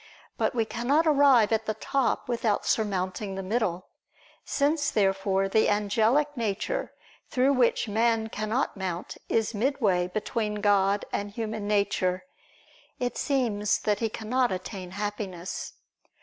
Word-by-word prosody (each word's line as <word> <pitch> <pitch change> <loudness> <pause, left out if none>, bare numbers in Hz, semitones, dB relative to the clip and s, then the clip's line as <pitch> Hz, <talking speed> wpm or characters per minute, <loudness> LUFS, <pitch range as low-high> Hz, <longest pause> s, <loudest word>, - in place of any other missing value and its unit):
But - - 0
we 225 -2 +2
cannot 260 +9 +1
arrive 275 -8 +5
at 220 0 0
the 215 - -1
top 270 +4 -1
without 230 -3 0
surmounting 195 -1 -1
the 195 - -4
middle. 185 -3 -1 0.5
Since, 290 +1 +1
therefore, 195 -1 +1
the 220 +3 +3
angelic 220 +8 +2
nature 220 -5 -2 0.4
through 260 +2 +3
which 245 -3 +2
man 225 +1 +1
cannot 215 +5 -1
mount 185 -3 -4
is 225 0 +1
midway 210 -6 +1
between 210 +2 -2
God 205 -1 +2
and 205 0 -2
human 215 -1 -4
nature; 195 -2 0 0.7
it 245 0 -2
seems 230 -8 +1
that 210 -1 0
he 225 - 0
cannot 240 +3 0
attain 185 0 -5
Happiness. 195 -2 -5
215 Hz, 130 wpm, -27 LUFS, 200-240 Hz, 0.7 s, arrive